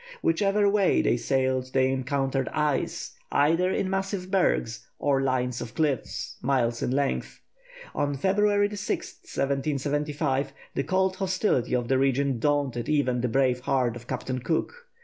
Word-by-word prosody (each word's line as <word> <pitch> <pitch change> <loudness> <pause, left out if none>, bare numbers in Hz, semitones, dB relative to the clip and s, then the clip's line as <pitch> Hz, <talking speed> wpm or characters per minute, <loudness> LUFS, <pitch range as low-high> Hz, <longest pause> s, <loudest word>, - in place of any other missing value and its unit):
Whichever 200 +5 +2
way 200 -2 +3
they - - +3
sailed 130 +1 0
they 130 0 +3
encountered 135 0 -1
ice, 150 -3 -1 0.2
either 165 +5 +3
in 190 - 0
massive 195 -1 -2
bergs, 145 - +1
or 140 -1 +1
lines 125 -2 0
of 115 - -7
cliffs, 150 -5 -2
miles 120 -3 +1
in - - 0
length. 135 +1 -1 0.5
On 145 -1 -1
February 205 +4 +2
6, 205 0 -2
1775, 140 0 -1 0.2
the 135 - -1
cold 190 +2 +1
hostility 185 - +1
of 120 -1 -1
the 130 +1 +2
region 135 -1 +1
daunted 140 -3 0
even 130 -5 +1
the 125 - +1
brave 130 0 +2
heart 125 -2 0
of 120 0 -10
Captain 130 0 -3
Cook. 160 - -1
140 Hz, 145 wpm, -26 LUFS, 130-170 Hz, 0.5 s, way